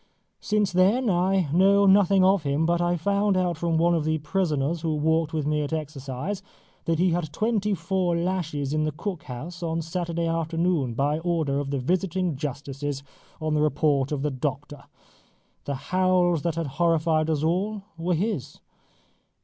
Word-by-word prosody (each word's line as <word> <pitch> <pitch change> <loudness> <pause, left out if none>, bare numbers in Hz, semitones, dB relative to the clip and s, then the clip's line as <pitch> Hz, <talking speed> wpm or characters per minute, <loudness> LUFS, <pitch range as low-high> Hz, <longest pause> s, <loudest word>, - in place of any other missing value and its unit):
Since 210 -2 0
then 205 +6 +3
I 185 0 +2
know 200 +3 +5
nothing 195 -1 +5
of 190 0 +4
him, 145 +2 0
but 170 +1 +1
I 175 0 +1
found 200 +3 +1
out 180 -2 +1
from 165 0 0
one 170 +2 +3
of 165 -3 +1
the 155 +1 0
prisoners 155 -1 -1
who 160 -2 -1
walked 160 +1 +1
with 155 -3 -2
me 150 0 +1
at 145 +1 -3
exercise 150 +4 -4 0.4
that 165 -1 +1
he 180 +2 +3
had 170 0 0
had 150 - -14
twenty 210 +1 0
four 175 0 0
lashes 165 -6 -2
in 155 0 +1
the 155 - 0
cook 175 +3 -5
house 155 +8 -7
on 165 -1 -2
Saturday 170 0 -2
afternoon, 165 -5 0
by 145 +4 +1
order 160 -5 0
of 145 -1 -3
the 140 - -1
visiting 180 +4 0
justices 140 0 -4 0.4
on 155 -1 -1
the 150 - +2
report 145 -2 +1
of 145 -2 -2
the 150 - 0
doctor. 140 +2 -4 0.8
The 140 - -2
howls 180 +3 +1
that 170 0 -1
had 165 -1 -2 0.2
horrified 160 -1 +2
us 155 -2 0
all 195 +5 0
were 170 +2 -1
his. 160 - -3
165 Hz, 175 wpm, -25 LUFS, 150-185 Hz, 0.8 s, know